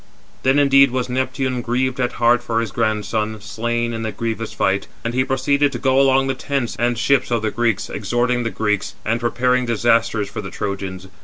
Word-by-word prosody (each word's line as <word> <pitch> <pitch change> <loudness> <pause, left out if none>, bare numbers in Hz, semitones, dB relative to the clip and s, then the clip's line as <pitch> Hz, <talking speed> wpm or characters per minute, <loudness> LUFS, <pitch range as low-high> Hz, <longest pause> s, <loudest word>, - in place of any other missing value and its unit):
Then 135 +2 +3
indeed 140 -1 +6
was 125 0 -2
Neptune 130 0 -1
grieved 125 +2 -1
at 125 -1 0
heart 120 +1 +3
for 115 -1 -1
his 115 -3 -2
grandson, 110 0 -1
slain 120 +3 -2
in 115 - -4
the 110 -1 -2
grievous 115 0 -4
fight; 100 +1 0 0.2
and 115 - -1
he 130 +1 +2
proceeded 140 +2 +1
to - - -2
go 135 0 +3
along 135 0 +4
the 135 - 0
tents 130 -2 -2
and 120 0 +1
ships 130 +2 +2
of 120 -2 0
the 110 - 0
Greeks, 115 -4 0
exhorting 120 +4 0
the 115 - -1
Greeks, 105 -2 -1
and 115 +2 0
prepared 125 +1 +1
disasters 115 -2 +2
for 100 - -6
the 95 - -7
Trojans. 95 -2 -5
120 Hz, 200 wpm, -20 LUFS, 110-130 Hz, 0.2 s, indeed